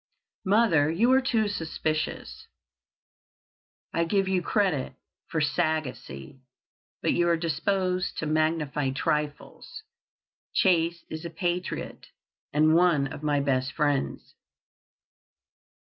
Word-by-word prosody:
"Mother, 190 Hz, -8 st, +4 dB
you 220 Hz, +10 st, +3 dB
are 265 Hz, +1 st, +5 dB
too 230 Hz, -5 st, +1 dB
suspicious. 160 Hz, -4 st, -3 dB, 1.5 s
I 170 Hz, -, +2 dB
give 195 Hz, +3 st, +1 dB
you 190 Hz, -1 st, +1 dB
credit 175 Hz, -9 st, 0 dB, 0.3 s
for 160 Hz, -, -2 dB
sagacity, 145 Hz, -, -2 dB, 0.6 s
but -, -, +2 dB
you 175 Hz, 0 st, +2 dB
are 170 Hz, -, +3 dB
disposed 180 Hz, +3 st, -1 dB
to -, -, -2 dB
magnify 150 Hz, -3 st, 0 dB
trifles. 150 Hz, -, -3 dB, 0.7 s
Chase 170 Hz, -2 st, +2 dB
is 160 Hz, +1 st, -5 dB
a 170 Hz, -, -5 dB
patriot, 175 Hz, +2 st, -3 dB, 0.4 s
and 155 Hz, +2 st, +4 dB
one 165 Hz, -6 st, +3 dB
of -, -, -8 dB
my 145 Hz, -2 st, +1 dB
best 130 Hz, -2 st, 0 dB
friends." 145 Hz, -3 st, -1 dB
160 Hz, 105 wpm, -27 LUFS, 150-180 Hz, 1.5 s, are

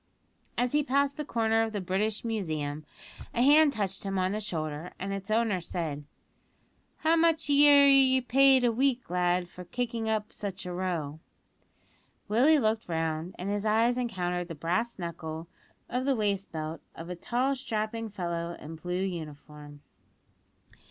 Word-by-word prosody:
As 245 Hz, 0 st, +1 dB
he 295 Hz, -, +3 dB
passed 280 Hz, 0 st, +1 dB
the 300 Hz, -, -4 dB
corner 225 Hz, -4 st, +1 dB
of 225 Hz, -1 st, -1 dB
the 205 Hz, -, -1 dB
British 200 Hz, +4 st, -1 dB
Museum 155 Hz, -9 st, -3 dB, 0.5 s
a 240 Hz, -, +3 dB
hand 295 Hz, +2 st, +6 dB
touched 195 Hz, -6 st, -3 dB
him 195 Hz, -1 st, -2 dB
on 185 Hz, 0 st, +1 dB
the 210 Hz, -, -2 dB
shoulder, 160 Hz, -5 st, -4 dB
and 195 Hz, +1 st, -4 dB
its 195 Hz, 0 st, -6 dB
owner 215 Hz, -4 st, +1 dB
said: 155 Hz, -4 st, -4 dB, 1.0 s
"How 320 Hz, +1 st, +4 dB
much 325 Hz, -2 st, +2 dB
are -, -, +5 dB
ye 280 Hz, -2 st, +7 dB
paid 265 Hz, +1 st, +5 dB
a 240 Hz, -, +4 dB
week, 250 Hz, -2 st, 0 dB
lad, 180 Hz, 0 st, +1 dB
for 180 Hz, +1 st, -10 dB
kicking 230 Hz, +3 st, -3 dB
up 215 Hz, -1 st, -2 dB
such 195 Hz, -3 st, -5 dB
a 180 Hz, -, -4 dB
row?" 170 Hz, -5 st, -3 dB, 1.1 s
Willie 255 Hz, +9 st, +5 dB
looked 220 Hz, -6 st, 0 dB
round, 160 Hz, +1 st, -2 dB
and 180 Hz, -, -5 dB
his 205 Hz, 0 st, -1 dB
eyes 225 Hz, +3 st, +3 dB
encountered 180 Hz, -8 st, -2 dB
the 165 Hz, -, -7 dB
brass 180 Hz, +10 st, -1 dB
buckle 165 Hz, -2 st, -6 dB, 0.4 s
of 250 Hz, +1 st, -2 dB
the 275 Hz, -1 st, +2 dB
waist 200 Hz, -3 st, -1 dB
belt 160 Hz, 0 st, -5 dB
of 170 Hz, +2 st, -8 dB
a -, -, -4 dB
tall, 250 Hz, +9 st, 0 dB
strapping 225 Hz, -3 st, -3 dB
fellow 170 Hz, -3 st, -4 dB
in 150 Hz, -, -9 dB
a 160 Hz, -1 st, -10 dB
blue 180 Hz, +1 st, -2 dB
uniform. 150 Hz, -4 st, -7 dB
200 Hz, 165 wpm, -29 LUFS, 170-245 Hz, 1.1 s, ye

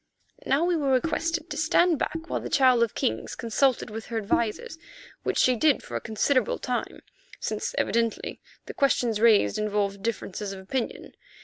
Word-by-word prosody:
Now 280 Hz, +4 st, +3 dB
we 355 Hz, 0 st, +2 dB
were 290 Hz, -4 st, 0 dB
requested 330 Hz, +5 st, -1 dB
to -, -, -4 dB
stand 330 Hz, 0 st, +3 dB
back 325 Hz, +1 st, -3 dB
while -, -, -2 dB
the -, -, -6 dB
Child 255 Hz, -3 st, +4 dB
of 230 Hz, -2 st, +1 dB
Kings 110 Hz, 0 st, -2 dB
consulted 235 Hz, +1 st, +1 dB
with 220 Hz, +1 st, -7 dB
her 230 Hz, -, -3 dB
advisers, 225 Hz, +8 st, -1 dB, 0.4 s
which -, -, -2 dB
she 255 Hz, -, +4 dB
did 290 Hz, +3 st, +2 dB
for -, -, -8 dB
a -, -, -2 dB
considerable 230 Hz, +3 st, +1 dB
time, 250 Hz, -1 st, -4 dB, 0.4 s
since -, -, -3 dB
evidently 230 Hz, -1 st, -1 dB, 0.2 s
the -, -, -7 dB
questions 240 Hz, -6 st, +1 dB
raised 215 Hz, -, +4 dB
involved 205 Hz, -2 st, -1 dB
differences 210 Hz, -2 st, -4 dB
of 195 Hz, -, -8 dB
opinion. 230 Hz, +6 st, -4 dB
235 Hz, 170 wpm, -26 LUFS, 215-280 Hz, 0.4 s, Child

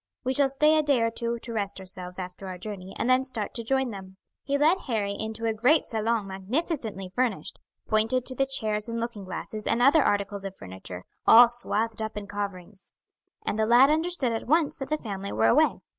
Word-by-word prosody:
"We 260 Hz, 0 st, 0 dB
shall 275 Hz, 0 st, +3 dB
stay 300 Hz, +3 st, +3 dB
a -, -, +4 dB
day 285 Hz, -4 st, +2 dB
or 230 Hz, -, +1 dB
two 235 Hz, +1 st, -3 dB
to 235 Hz, 0 st, -7 dB
rest 200 Hz, -3 st, -3 dB
ourselves 180 Hz, -1 st, -7 dB
after 185 Hz, +1 st, -7 dB
our 185 Hz, -1 st, -6 dB
journey, 190 Hz, -1 st, -8 dB
and -, -, -1 dB
then 255 Hz, +1 st, +4 dB
start 240 Hz, -6 st, -2 dB
to 230 Hz, -, -5 dB
join 265 Hz, +1 st, 0 dB
them." 190 Hz, -2 st, -10 dB, 0.2 s
He 280 Hz, 0 st, -1 dB
led 315 Hz, +6 st, +4 dB
Harry 215 Hz, -5 st, -1 dB
into 220 Hz, +2 st, -4 dB
a 225 Hz, -, +1 dB
great 250 Hz, +9 st, +3 dB
salon 225 Hz, -1 st, -1 dB
magnificently 195 Hz, -, -3 dB
furnished, 250 Hz, +1 st, -2 dB, 0.3 s
pointed 225 Hz, +3 st, +2 dB
to 260 Hz, -, +2 dB
the 270 Hz, +1 st, +1 dB
chairs 215 Hz, -4 st, -1 dB
and 230 Hz, 0 st, -3 dB
looking 230 Hz, -4 st, -5 dB
glasses 210 Hz, +3 st, -6 dB
and 230 Hz, -, +1 dB
other 275 Hz, +5 st, +5 dB
articles 200 Hz, -2 st, -1 dB
of 195 Hz, -1 st, -6 dB
furniture, 95 Hz, -1 st, -9 dB, 0.2 s
all 235 Hz, +2 st, +9 dB
swathed 225 Hz, -2 st, -1 dB
up 220 Hz, -1 st, -4 dB
in 205 Hz, -, -5 dB
coverings; 200 Hz, -1 st, -7 dB, 0.5 s
and 215 Hz, -, -2 dB
the 220 Hz, -, +2 dB
lad 250 Hz, +5 st, +6 dB
understood 320 Hz, -5 st, +1 dB
at 225 Hz, 0 st, -4 dB
once 310 Hz, +1 st, +2 dB
that 270 Hz, -1 st, -5 dB
the 305 Hz, -, 0 dB
family 200 Hz, -6 st, -6 dB
were 110 Hz, +1 st, +1 dB
away. -, -, +3 dB
225 Hz, 210 wpm, -26 LUFS, 200-260 Hz, 0.5 s, all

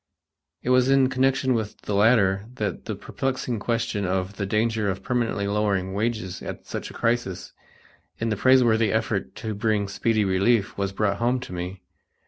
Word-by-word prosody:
It 125 Hz, -, 0 dB
was 125 Hz, 0 st, +4 dB
in 135 Hz, -1 st, +4 dB
connection 130 Hz, 0 st, +2 dB
with 110 Hz, -3 st, -3 dB
the 105 Hz, -, -4 dB
latter 100 Hz, -2 st, +3 dB
that -, -, -3 dB
the -, -, -3 dB
perplexing 130 Hz, -3 st, -3 dB
question 115 Hz, -2 st, -1 dB
of 95 Hz, +1 st, -2 dB
the 100 Hz, -, -2 dB
danger 110 Hz, 0 st, +1 dB
of 95 Hz, 0 st, -4 dB
permanently 120 Hz, -5 st, 0 dB
lowering 100 Hz, -2 st, 0 dB
wages 105 Hz, -3 st, -2 dB
at -, -, -7 dB
such -, -, -5 dB
a -, -, -11 dB
crisis, 115 Hz, -6 st, -1 dB, 0.6 s
in 115 Hz, -, -1 dB
the 105 Hz, -, 0 dB
praiseworthy 115 Hz, -2 st, +4 dB
effort 110 Hz, -2 st, -1 dB
to 110 Hz, -1 st, -4 dB
bring 105 Hz, -1 st, 0 dB
speedy 110 Hz, +2 st, +1 dB
relief, 100 Hz, +3 st, +2 dB
was 100 Hz, -1 st, -2 dB
brought 100 Hz, 0 st, 0 dB
home 120 Hz, +3 st, +1 dB
to 110 Hz, -, -8 dB
me. 90 Hz, +1 st, -5 dB
110 Hz, 170 wpm, -25 LUFS, 100-120 Hz, 0.6 s, was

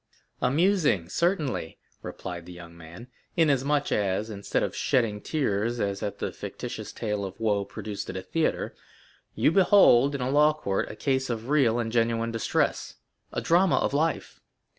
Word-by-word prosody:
"Amusing, 150 Hz, -, +2 dB
certainly," 155 Hz, -, -1 dB, 0.2 s
replied 85 Hz, -2 st, -7 dB
the -, -, -9 dB
young 85 Hz, -1 st, -11 dB
man, 85 Hz, +8 st, -12 dB, 0.3 s
"inasmuch 145 Hz, -2 st, +2 dB
as, 105 Hz, +2 st, 0 dB
instead 100 Hz, -1 st, -2 dB
of -, -, -3 dB
shedding 110 Hz, -5 st, 0 dB
tears 120 Hz, -5 st, -1 dB
as 100 Hz, -2 st, -2 dB
at 100 Hz, -, -4 dB
the -, -, -3 dB
fictitious -, -, -7 dB
tale 105 Hz, -2 st, -3 dB
of 95 Hz, +1 st, -7 dB
woe 105 Hz, -3 st, +1 dB
produced 100 Hz, +1 st, -6 dB
at 95 Hz, -, -4 dB
a 95 Hz, -, -5 dB
theatre, 165 Hz, +8 st, -1 dB, 0.6 s
you -, -, +3 dB
behold 165 Hz, -8 st, +5 dB
in 135 Hz, -, -4 dB
a 125 Hz, +1 st, -1 dB
law 150 Hz, +2 st, +5 dB
court 100 Hz, -10 st, -2 dB
a -, -, -8 dB
case 130 Hz, +2 st, -1 dB
of 115 Hz, +1 st, -4 dB
real 135 Hz, -6 st, +3 dB
and 115 Hz, -2 st, -2 dB
genuine 115 Hz, 0 st, +1 dB
distress—a 115 Hz, -3 st, -3 dB
drama 175 Hz, +2 st, +3 dB
of -, -, 0 dB
life. 160 Hz, +3 st, -1 dB
115 Hz, 160 wpm, -27 LUFS, 100-145 Hz, 0.6 s, behold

